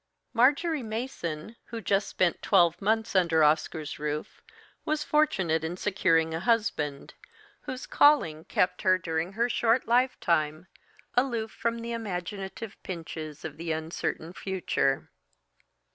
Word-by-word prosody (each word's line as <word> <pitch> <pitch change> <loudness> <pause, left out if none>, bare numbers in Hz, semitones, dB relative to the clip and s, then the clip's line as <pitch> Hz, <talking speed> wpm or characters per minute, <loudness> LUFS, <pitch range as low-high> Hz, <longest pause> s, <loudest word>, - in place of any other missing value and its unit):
Marjory 285 +6 +3
Mason, 220 -5 -5
who 230 - -6
just 200 -2 +1
spent 180 -2 0
twelve 175 -3 +3
months 220 +1 0
under 170 -4 +4
Oscar's 155 0 +1
roof, 150 +5 -4 0.4
was 305 0 -1
fortunate 195 - +2
in 165 +2 -3
securing 165 -5 +2
a 160 - -1
husband, 170 -9 0 0.5
whose 260 0 -5
calling 170 - +4
kept 180 0 +1
her 185 -2 +4
during 165 +1 -2
her 230 +3 +1
short 240 0 +2
lifetime 170 - +1 0.5
aloof 235 -4 +1
from 230 0 -2
the 230 0 -5
imaginative 195 -1 -5
pinches 160 -4 -7
of 155 -2 -6
the 165 0 -3
uncertain 160 +1 -3
future. 185 -8 -1
190 Hz, 125 wpm, -28 LUFS, 160-230 Hz, 0.5 s, under